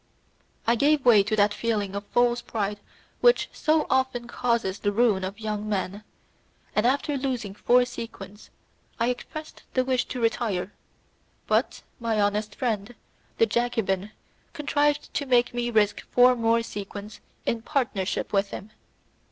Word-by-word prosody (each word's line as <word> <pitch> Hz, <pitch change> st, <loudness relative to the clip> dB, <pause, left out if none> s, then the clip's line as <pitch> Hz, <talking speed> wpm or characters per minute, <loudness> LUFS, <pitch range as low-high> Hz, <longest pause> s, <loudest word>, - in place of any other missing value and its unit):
I 230 Hz, -, +4 dB
gave 285 Hz, +3 st, +2 dB
way 225 Hz, -4 st, +7 dB
to 210 Hz, +2 st, -1 dB
that 205 Hz, 0 st, +3 dB
feeling 210 Hz, -4 st, -1 dB
of 200 Hz, 0 st, -5 dB
false 240 Hz, 0 st, +2 dB
pride 205 Hz, -2 st, -3 dB, 0.4 s
which 485 Hz, 0 st, +4 dB
so 310 Hz, 0 st, +2 dB
often 260 Hz, -2 st, 0 dB
causes 235 Hz, -6 st, -1 dB
the 205 Hz, -, 0 dB
ruin 210 Hz, -3 st, +2 dB
of 195 Hz, +3 st, -5 dB
young 215 Hz, -1 st, -3 dB
men, 200 Hz, 0 st, -2 dB, 0.7 s
and 215 Hz, +3 st, +3 dB
after 285 Hz, +3 st, +1 dB
losing 250 Hz, -7 st, -3 dB
four 245 Hz, +4 st, +3 dB
sequins 210 Hz, -4 st, -9 dB, 0.5 s
I 230 Hz, +1 st, +2 dB
expressed 310 Hz, +5 st, -8 dB
a 255 Hz, -, +3 dB
wish 255 Hz, -1 st, +1 dB
to 250 Hz, -, -5 dB
retire, 215 Hz, -5 st, -1 dB, 0.7 s
but -, -, 0 dB, 0.2 s
my 230 Hz, -2 st, 0 dB
honest 205 Hz, 0 st, 0 dB
friend, 225 Hz, -2 st, -2 dB, 0.4 s
the 225 Hz, -, +5 dB
Jacobin 215 Hz, -4 st, 0 dB, 0.4 s
contrived 295 Hz, -1 st, 0 dB
to 285 Hz, -, -2 dB
make 245 Hz, -1 st, +3 dB
me 240 Hz, 0 st, -1 dB
risk 215 Hz, -3 st, +2 dB
four 250 Hz, 0 st, +6 dB
more 230 Hz, 0 st, +2 dB
sequins 205 Hz, 0 st, -7 dB, 0.3 s
in 230 Hz, -, 0 dB
partnership 235 Hz, -11 st, -1 dB
with 200 Hz, 0 st, +2 dB
him. 200 Hz, +3 st, -8 dB
230 Hz, 145 wpm, -26 LUFS, 205-245 Hz, 0.7 s, way